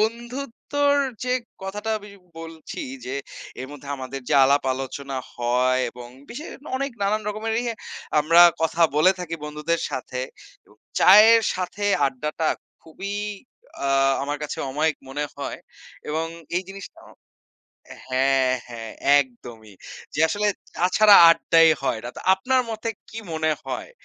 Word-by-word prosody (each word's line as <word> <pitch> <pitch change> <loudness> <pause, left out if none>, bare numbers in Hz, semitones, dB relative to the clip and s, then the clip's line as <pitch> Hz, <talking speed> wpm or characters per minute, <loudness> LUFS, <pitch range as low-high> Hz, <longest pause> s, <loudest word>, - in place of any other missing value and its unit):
বন্ধুত্বর 245 +5 -1 0.3
যে 250 - 0 0.3
কথাটা 210 +3 -4
আমি 205 0 -13 0.3
বলছি 165 -1 -8 0.2
যে 130 - -4 0.5
এর 130 - -5
মধ্যে 145 -1 -11
আমাদের 130 +1 -6
যে - - +2
আলাপ 140 +2 +3
আলোচনা 135 +1 -5 0.2
হয় 125 +2 +1
এবং 120 0 -11 0.2
বিশেষ 290 +7 -7 0.3
অনেক 275 +1 -2
নানান 210 +2 +1
রকমের 215 +2 -3
ইয়ে 235 -2 -2 0.5
আমরা 165 +3 +5 0.2
কথা 160 +1 +1
বলে 185 +5 +5
থাকি 170 -2 -4
বন্ধুদের 150 +2 -2
সাথে। 125 0 -4 0.5
এবং - - -23 0.2
চায়ের 220 +4 +8
সাথে 185 +3 -4 0.2
আড্ডাটা 150 +4 -2 0.3
খুবই 195 +5 -7 0.7
আ - - +1 0.3
আমার 145 +1 -3
কাছে 150 - -5
অমায়িক 155 +3 0
মনে 145 +2 -3
হয় 140 - -5 0.5
এবং 160 +2 -1 0.3
এই 185 - 0
জিনিসটা 195 0 -10 1.1
হ্যাঁ, 130 0 +2
হ্যাঁ, 115 -2 -8 0.3
একদমই 120 -5 -7 0.4
যে - - -3
আসলে 210 +3 0 0.3
চা 180 - +1
ছাড়া 215 -1 +8
আড্ডাই 165 0 +5
হয় 125 -4 0
না 120 - -5
তো - - -8
আপনার 255 +7 +1
মতে 220 0 -3 0.2
কি 225 - -9
মনে 155 0 0
হয়? - - -5
160 Hz, 135 wpm, -23 LUFS, 135-210 Hz, 1.1 s, চায়ের